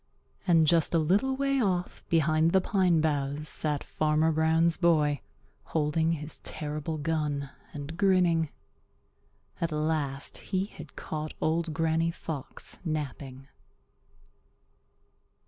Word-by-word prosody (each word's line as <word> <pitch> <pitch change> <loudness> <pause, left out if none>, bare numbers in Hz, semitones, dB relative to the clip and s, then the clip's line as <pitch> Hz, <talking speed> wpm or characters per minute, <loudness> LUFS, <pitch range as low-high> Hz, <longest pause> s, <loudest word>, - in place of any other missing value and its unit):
And 165 -3 +5
just 165 +1 +3
a - - +6
little 195 +12 +2
way 275 0 +1
off 180 -4 -1
behind 160 0 +3
the 190 - +6
pine 185 -4 +2
boughs 145 -1 -1
sat 150 -3 0
Farmer 155 +1 +1
Brown's 160 +1 +3
boy 150 -5 +2 0.4
holding 160 +1 +1
his 150 -1 -4
terrible 150 +1 -4
gun 150 -2 -1 0.2
and 145 +2 -7
grinning. 180 -5 +3 1.1
At 170 -1 0
last 150 -3 -2
he 190 -1 -1
had - - -12
caught 155 0 -5
Old 165 +1 0
Granny 165 0 +1
Fox 155 -4 -6
napping. 140 -4 -4
160 Hz, 110 wpm, -29 LUFS, 150-170 Hz, 1.1 s, a